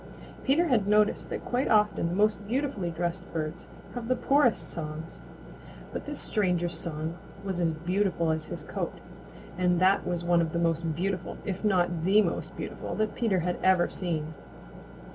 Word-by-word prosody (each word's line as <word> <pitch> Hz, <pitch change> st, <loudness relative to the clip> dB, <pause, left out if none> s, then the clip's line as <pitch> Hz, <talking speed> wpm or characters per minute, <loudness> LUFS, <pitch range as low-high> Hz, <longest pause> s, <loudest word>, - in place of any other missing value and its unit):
Peter 295 Hz, +6 st, +4 dB
had 225 Hz, -8 st, +2 dB
noticed 210 Hz, 0 st, +3 dB
that -, -, -4 dB
quite 250 Hz, +2 st, 0 dB
often 210 Hz, -5 st, +3 dB
the 175 Hz, -, -2 dB
most 205 Hz, 0 st, +2 dB
beautifully 245 Hz, -7 st, -1 dB
dressed 175 Hz, +2 st, -2 dB
birds 160 Hz, +1 st, -4 dB, 0.3 s
have 240 Hz, -2 st, -5 dB
the 255 Hz, -, +2 dB
poorest 275 Hz, -4 st, +3 dB
songs. 160 Hz, 0 st, -6 dB, 0.7 s
But -, -, -5 dB
this 295 Hz, -1 st, -4 dB
stranger's 180 Hz, -5 st, 0 dB
song 160 Hz, +1 st, -4 dB, 0.2 s
was 190 Hz, -3 st, -2 dB
as 165 Hz, -1 st, +2 dB
beautiful 170 Hz, 0 st, 0 dB
as 155 Hz, 0 st, -2 dB
his -, -, -6 dB
coat, -, -, -4 dB, 0.6 s
and 180 Hz, -1 st, +3 dB
that 190 Hz, +2 st, +4 dB
was 175 Hz, -1 st, -1 dB
one 175 Hz, 0 st, +4 dB
of 160 Hz, -1 st, -1 dB
the -, -, 0 dB
most 165 Hz, -1 st, +1 dB
beautiful, 185 Hz, +1 st, -2 dB
if 195 Hz, 0 st, -3 dB
not 175 Hz, -5 st, +2 dB
the 200 Hz, +4 st, +5 dB
most -, -, -3 dB
beautiful, -, -, -5 dB
that 215 Hz, 0 st, 0 dB
Peter 195 Hz, -7 st, +1 dB, 0.2 s
ever 185 Hz, -2 st, +5 dB
had -, -, -7 dB
seen. 160 Hz, -4 st, -2 dB
180 Hz, 170 wpm, -28 LUFS, 170-210 Hz, 0.7 s, the